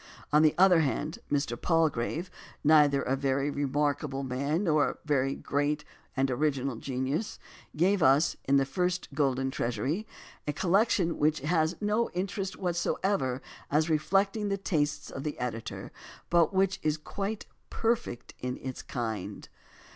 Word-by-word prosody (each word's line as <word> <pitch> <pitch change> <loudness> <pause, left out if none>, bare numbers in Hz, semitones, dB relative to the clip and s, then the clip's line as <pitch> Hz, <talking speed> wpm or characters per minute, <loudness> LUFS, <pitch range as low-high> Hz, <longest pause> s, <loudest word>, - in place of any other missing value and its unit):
On 150 - +7
the 155 -1 +4
other 180 -2 +6
hand, 150 +1 -1
Mr. 140 -4 0
Palgrave, 165 0 +1 0.3
neither 145 -2 +5
a 130 - +1
very 135 +1 0
remarkable 145 0 -1
man 140 +7 -1
nor 155 -5 +2 0.2
a 135 0 +1
great 145 +1 -1 0.3
and 135 0 +2
original 135 -2 0
genius, 135 - -2 0.4
gave 185 +4 +3
us 140 +3 +4
in 140 +1 +4
the 135 - +3
first 180 +6 -1
Golden 135 -2 +1
Treas 120 -2 -2
ury 175 +11 -2 0.4
a 150 - 0
collection 185 +1 +2
which 155 0 +2
has 160 +2 +1
no 215 +3 +1
interest 190 +1 -3
whatever 175 -6 -1 0.3
as 155 +3 +2
re 155 - +3
flecting 200 +5 +1
the 200 - 0
tastes 150 -6 -1
of 135 - -6
the 150 -1 -3
editor, 115 -2 -5 0.4
but 170 0 +4
which 190 0 +1
is 155 0 +1
quite 200 +7 -4 0.2
perfect 230 - -1
in 125 0 -3
its 130 -1 -6
kind. 110 -6 -5
150 Hz, 145 wpm, -29 LUFS, 135-180 Hz, 0.4 s, On